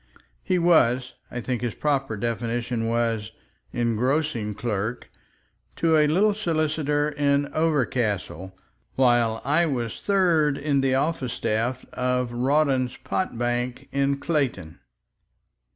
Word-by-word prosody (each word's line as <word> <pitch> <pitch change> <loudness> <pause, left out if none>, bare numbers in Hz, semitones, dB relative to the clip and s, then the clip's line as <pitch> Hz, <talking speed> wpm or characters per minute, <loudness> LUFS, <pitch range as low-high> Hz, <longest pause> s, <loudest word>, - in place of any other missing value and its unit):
He 185 - +1
was—I 125 -7 +1
think 125 0 -3
his 120 -2 -3
proper 135 -6 -1
definition 115 +1 -2
was 115 -2 0 0.4
"engrossing 120 -1 0
clerk" 110 +1 -3 0.6
to 165 -1 +2
a 150 -1 +5
little 200 +7 +3
solicitor 155 -6 0
in 145 -1 +1
Overcastle, 120 - -1 0.4
while 120 -3 +2
I 160 +5 +3
was 120 -6 -3
third 170 -8 +2
in 140 -1 +1
the 135 -1 +2
office 135 -3 -1
staff 120 +4 -1
of 125 -1 0
Rawdon's 130 0 +1
pot 185 -11 -3
bank 120 +1 -2
in 140 0 +1
Clayton. 130 - -2
130 Hz, 110 wpm, -25 LUFS, 120-150 Hz, 0.6 s, a